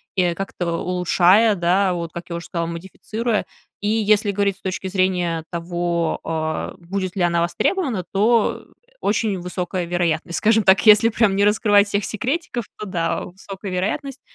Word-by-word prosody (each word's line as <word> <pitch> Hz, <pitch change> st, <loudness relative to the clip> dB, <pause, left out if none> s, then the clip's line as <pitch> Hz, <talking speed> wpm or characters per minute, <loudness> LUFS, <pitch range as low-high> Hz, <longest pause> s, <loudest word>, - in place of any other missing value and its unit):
и 180 Hz, -2 st, +2 dB
как-то 175 Hz, -2 st, -4 dB
улучшая, 180 Hz, +4 st, +3 dB
да, 180 Hz, +2 st, +2 dB
вот 170 Hz, -2 st, -4 dB
как 170 Hz, +1 st, -8 dB
я 170 Hz, -, -4 dB
уже 170 Hz, -, -8 dB
сказала, 170 Hz, -1 st, -3 dB
модифицируя. 210 Hz, +6 st, -3 dB, 0.4 s
И 205 Hz, -, -2 dB
если 215 Hz, -1 st, +2 dB
говорить 200 Hz, -1 st, 0 dB
с -, -, -19 dB
точки 190 Hz, 0 st, -4 dB
зрения 180 Hz, -3 st, 0 dB
того, 170 Hz, -1 st, -2 dB
э, 160 Hz, -1 st, -3 dB
будет 185 Hz, +1 st, -4 dB
ли -, -, 0 dB
она 170 Hz, -1 st, +2 dB
востребована, 235 Hz, -, 0 dB
то 220 Hz, +3 st, +2 dB, 0.4 s
очень 205 Hz, -2 st, 0 dB
высокая 180 Hz, 0 st, -3 dB
вероятность, 170 Hz, -1 st, -1 dB
скажем 220 Hz, 0 st, +3 dB
так. 190 Hz, 0 st, +5 dB
Если 215 Hz, +1 st, +7 dB
прям 215 Hz, -3 st, +2 dB
не 200 Hz, -, +3 dB
раскрывать 205 Hz, -1 st, +4 dB
всех 200 Hz, 0 st, -1 dB
секретиков, 250 Hz, +1 st, -3 dB
то 215 Hz, -, -5 dB
да, 170 Hz, -3 st, -2 dB
высокая 195 Hz, +2 st, -9 dB
вероятность. 245 Hz, +10 st, -3 dB
190 Hz, 160 wpm, -21 LUFS, 175-210 Hz, 0.4 s, Если